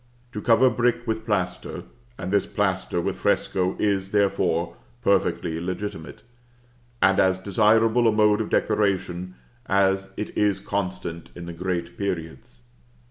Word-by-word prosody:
To 105 - -5
cover 120 +3 +5
brick 120 +1 +1
with 110 -1 -3
plaster, 95 -4 -2 0.3
and 95 0 -5
this 100 - +2
plaster 95 -3 -1
with - - -2
fresco, 95 0 +1
is, 100 -2 0
therefore, 95 -4 +1 0.3
perfectly 85 -4 +1
legitimate; 90 -2 -5 0.8
and 95 0 +4
as 95 -1 +3
desirable 110 +5 +3
a - - +5
mode 105 0 +3
of 110 - -4
decoration 90 -3 0 0.3
as 95 0 +2
it 105 - -5
is 100 -2 +2
constant 90 -4 -4
in 85 - -8
the 85 - -7
great 85 0 -4
periods. 80 -10 -5
95 Hz, 135 wpm, -24 LUFS, 90-105 Hz, 0.8 s, cover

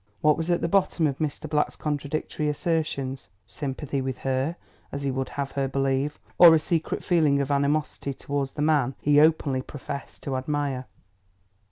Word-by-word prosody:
What 150 -1 +5
was 165 +1 -3
at 175 - +2
the - - +1
bottom 180 -2 +2
of 140 -3 -1
Mr. 155 0 -2
Black's 150 -1 0
contradictory 150 +1 -2
assertions? 145 -4 -2 0.2
Sympathy 140 +2 -4
with 130 -1 -3
her, 135 +5 -1 0.4
as 140 - -4
he 140 - 0
would 130 0 -2
have 140 -1 -4
her 140 -1 -1
believe, 135 +2 0 0.2
or 170 -2 +10
a - - +6
secret 160 +1 -1
feeling 155 -5 +3
of 140 0 -1
animosity 140 -1 0
towards 140 -1 -3
the 150 - -2
man 145 -4 +2
he 145 0 +4
openly 150 -4 +3
professed 140 +1 -8
to 135 - -2
admire? 135 -1 -2
145 Hz, 170 wpm, -26 LUFS, 135-155 Hz, 0.4 s, or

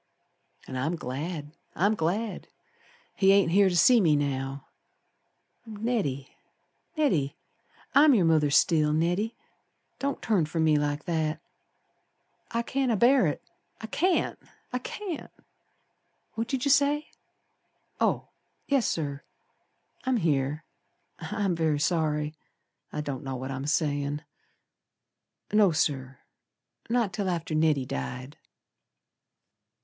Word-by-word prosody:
And 130 - -5
I'm 155 +7 0
glad! 150 +2 -5 0.2
I'm 200 +4 +3
glad! 205 +4 -2 0.7
He 195 -1 +4
ain't 195 -4 +4
here 195 +1 +5
to 175 - 0
see 240 +6 +6
me 160 -5 +4
now. 135 -1 -2 1.0
Neddy! 210 - -2 0.6
Neddy! 165 - +1 0.6
I'm 285 -1 +7
your 190 -6 +3
mother 155 -3 +3
still, 150 +1 +3
Neddy. 175 +8 0 0.6
Don't 280 0 -2
turn 195 -9 +1
from 160 +1 -1
me 155 -1 +4
like 145 0 -2
that. 160 -2 -1 1.1
I 235 0 -1
can't 265 +1 0
abear 240 0 +4
it. 145 - -3 0.4
I - - -6
can't! 355 +10 0 0.3
I 250 - 0
can't! 360 +5 -6 1.0
What 225 0 -3
did 260 +1 -2
you 280 - +3
say? 290 +2 +3 0.9
Oh, - - 0 0.4
yes, 275 -4 +2
Sir. 145 -3 -2 0.8
I'm 260 -2 +1
here. 150 -4 0 0.6
I'm 205 -4 -1
very 160 -3 +1
sorry, 150 -2 0 0.6
I 150 - -3
don't 140 -4 -5
know 135 -1 -4
what 130 +2 -5
I'm 135 +1 -4
sayin'. 145 -1 0 1.3
No, 210 -3 +5
Sir, 135 -4 -1 0.7
Not 230 -5 +1
till 190 +1 -1
after 165 -2 -3
Neddy 155 -4 +2
died. 125 - -6
165 Hz, 115 wpm, -27 LUFS, 145-220 Hz, 1.3 s, I'm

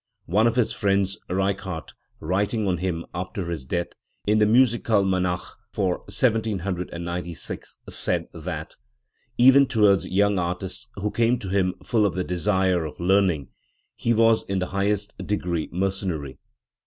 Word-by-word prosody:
One 105 +7 +3
of 115 - +1
his 125 -3 +2
friends, 100 0 +1
Reichardt, 95 -2 -2 0.3
writing 100 +5 0
on 90 -3 0
him, 85 -2 -2
after 90 0 -4
his 80 -6 -5
death, 85 +6 -2 0.4
in 105 +1 +3
the 105 - +5
Mmikalmanach 100 -7 +2
for 95 -3 0
1796, 90 -7 -2
said - - -2
that" 80 -1 -6 0.6
Even 135 +2 +7
towards 105 -5 +3
young 100 0 +2
artists 90 +2 -3
who 100 +1 -2
came 120 +1 +2
to 95 - -6
him 95 -1 +1
full 110 -4 +3
of 90 - -4
the 90 - 0
desire 90 0 +1
of 75 - -7
learning, 90 -6 +2 0.5
he 115 - 0
was 115 -1 +4
in 95 - -2
the 90 -1 -1
highest 100 +1 0
degree 90 -6 -2
mercenary". 90 -7 -2
95 Hz, 140 wpm, -24 LUFS, 90-105 Hz, 0.6 s, Even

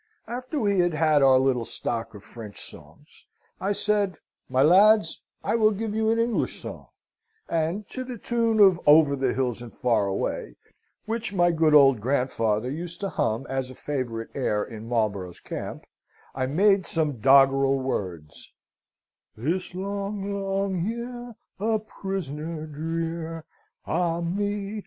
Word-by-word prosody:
After 255 +5 -4
we 200 -5 +1
had 175 -2 +2
had 155 -2 +3
our 135 -1 +6
little 130 -2 +2
stock 115 0 -4
of 100 - -11
French 110 -4 -9
songs, - - -9 0.3
I 195 - -1
said, 205 -3 +1 0.3
'My 130 +1 +3
lads, 195 +2 +5 0.2
I - - 0
will 220 -2 +5
give 215 +1 -3
you 220 0 +1
an 225 - +2
English 230 0 0
song,' - - -8 0.6
and 170 +5 -1
to 255 - -4
the 250 -2 -7
tune 230 0 0
of 190 -4 +6
'Over 150 -1 +6
the 130 -2 0
hills 125 -3 -1
and 120 -2 -10
far 115 -5 +1
away,' 95 -10 -3 0.5
which 225 -1 -3
my 175 -1 +4
good 160 -2 +3
old 135 -6 +6
grandfather 125 -2 0
used 170 +3 -6
to 195 - -1
hum 115 -3 -1
as 135 -1 -3
a 130 - -10
favourite 120 -6 -4
air 105 -6 0
in 110 0 -9
Marlborough's 100 -7 -1
camp, - - -7 0.5
I 130 -1 -1
made 195 +6 +3
some 150 -6 0
doggerel 135 +1 +5
words: 90 - -5 0.8
'This 170 +10 -2
long, 200 +1 -3
long 195 -1 -1
year, 235 +4 -5 0.2
a 220 +2 +1
prisoner 165 -7 -5
drear; 165 +1 -4 0.4
Ah, 170 -1 0
me! 205 +4 -2
165 Hz, 145 wpm, -25 LUFS, 130-200 Hz, 0.8 s, our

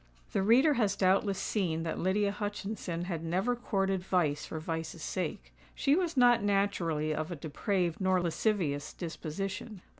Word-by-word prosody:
The - - +1
reader 250 +9 +5
has 200 -2 +2
doubtless 195 +1 +2
seen 175 -5 -1
that 165 - -3
Lydia 200 +2 +2
Hutchinson 205 -4 -4
had 170 -3 -4
never 185 +9 0
courted 195 -5 0
vice 175 -6 0
for 160 - -5
vice's 160 0 -4
sake. 150 - -4 0.2
She 275 - +2
was 340 -4 -1
not 245 -2 +6
naturally 185 -7 +1
of 155 +3 -3
a - - -3
depraved 170 +4 -1
nor 185 -1 +3
lascivious 170 -4 0
disposition. 190 +5 -5
185 Hz, 150 wpm, -31 LUFS, 165-205 Hz, 0.2 s, not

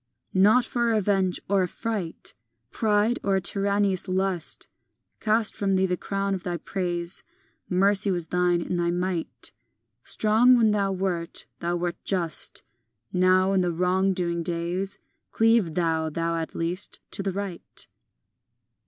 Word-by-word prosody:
V 185 - 0
Not 220 +6 +5
for 240 -1 -1
revenge 200 -5 +1
or 195 0 +2
affright, 185 -1 -4 0.4
Pride, 215 +2 +1
or 195 -1 +2
a - - +3
tyrannous 200 +1 +1
lust, 185 -3 -1 0.5
Cast 220 0 +2
from 195 -1 0
thee 190 0 +3
the 180 -1 0
crown 195 +2 -2
of 190 - -3
thy 175 -1 -3
praise. 175 0 -4 0.5
Mercy 195 +2 +2
was 175 -3 0
thine 180 -1 +2
in 180 - -2
thy 170 0 +1
might; 175 -8 -2 0.5
Strong 230 +4 +4
when 225 -2 +4
thou 200 -2 +1
wert, 180 -3 -3
thou 175 +1 -1
wert 175 0 -2
just; 175 -5 0 0.5
Now, 185 +1 +3
in 190 - +3
the 175 -1 0
wrong 180 +3 +1
doing 170 -2 -1
days, 175 +4 -2 0.3
Cleave 225 -7 +3
thou, 160 -2 0
thou 165 +2 -2
at 165 -1 -5
least, 175 +4 +3
to - - -3
the 195 0 -1
right. 195 -2 -5
185 Hz, 145 wpm, -25 LUFS, 175-200 Hz, 0.5 s, Not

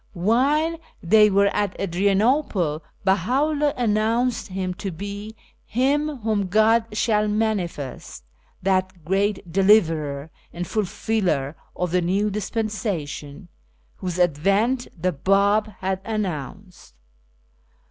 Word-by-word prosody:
While 275 - +1 0.2
they 210 +4 +6
were 200 0 +3
at 205 -2 0
Adrian 195 +2 +1
ople, 200 - +1 0.2
Bella 190 +1 +3
vJlldh 290 - +1
announced 230 +1 +1
himself 185 -1 -4
to 200 - -3
be 200 +5 -7 0.3
"Him 275 +2 0
vjhom 210 -4 0
God 220 +3 +4
shall 210 -2 +2
manifest" 195 - -3 0.4
that 185 -3 0
Great 195 0 0
Deliverer 160 -7 +2 0.2
and 175 +1 -5
Fulfiller 185 -8 -1 0.2
of 180 -2 -2
the 180 0 +2
New 195 +4 0
Dispensation, 195 -7 -4 0.5
whose 180 -2 -4
advent 195 - +2
the 180 +2 +1
Bab 200 +6 +2
had 190 0 -1
announced. 190 - -5
200 Hz, 105 wpm, -23 LUFS, 180-220 Hz, 0.5 s, they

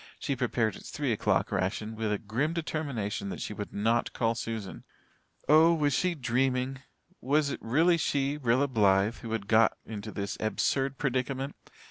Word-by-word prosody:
She 140 - -2
prepared 115 -4 0
its - - -10
three - - -1
o'clock - - +1
ration 105 +4 -2
with 110 -1 -2
a 105 - +1
grim 120 +11 -1
determination 140 -12 -3
that - - -5
she - - -4
would 105 0 -6
not 115 +3 0
call 115 -1 +1
Susan. 115 -3 -5 0.6
Oh, 160 +3 +6
was 145 -3 +1
she 180 -2 +1
dreaming? 130 0 0 0.4
Was 145 +2 +2
it - - -4
really 165 +9 +3
she, 145 -2 0
Rilla 130 +1 +2
Blythe, 105 -3 +3
who 115 - -8
had 105 -3 -3
got 110 +1 +4
into 110 -1 -6
this 100 -1 -4
absurd 135 +5 0
predicament? 135 +1 -2
120 Hz, 165 wpm, -29 LUFS, 110-140 Hz, 0.6 s, Oh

